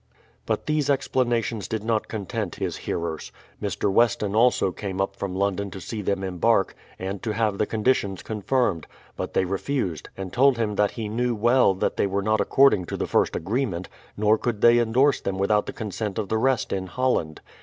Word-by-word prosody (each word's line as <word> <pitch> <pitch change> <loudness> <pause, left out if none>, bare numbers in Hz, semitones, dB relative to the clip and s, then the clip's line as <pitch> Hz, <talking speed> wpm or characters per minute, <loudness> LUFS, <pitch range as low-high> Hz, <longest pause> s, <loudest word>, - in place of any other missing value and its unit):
But - - -1
these 150 -2 0
explanations 120 -5 0
did 110 -2 -3
not 110 -1 0
content 105 -2 -4
his - - -3
hearers. 85 -2 -4 0.3
Mr. 100 0 -1
Weston 105 -2 +2
also 115 -4 +3
came 95 +1 -5
up 95 0 -1
from 95 -2 -4
London 100 +1 -1
to 95 - -8
see 110 +2 -5
them 100 -1 -1
embark, 95 +3 +1 0.2
and 95 +1 -5
to 110 -3 -2
have 105 -2 0
the 105 - +1
conditions 105 -4 0
confirmed; 110 -4 -1 0.3
but - - -5
they 95 - +3
refused, 95 - -2
and 95 -2 -6
told 135 0 +4
him 110 -3 0
that 105 0 +3
he 110 -2 -3
knew 120 +3 0
well 120 -1 +4
that 95 - -1
they - - +2
were 100 +1 -1
not 110 +1 +2
according 135 -9 +4
to - - -5
the - - -1
first - - +1
agreement, 95 -2 -2 0.3
nor 105 +1 +3
could 115 -4 -2
they 120 0 +6
endorse 125 +5 +3
them 95 -1 -3
without 105 +2 +2
the - - -3
consent 105 -1 -4
of 105 -3 -2
the 110 - +1
rest 130 +1 +1
in 95 -1 -2
Holland. 90 -10 -1
105 Hz, 195 wpm, -24 LUFS, 95-120 Hz, 0.3 s, they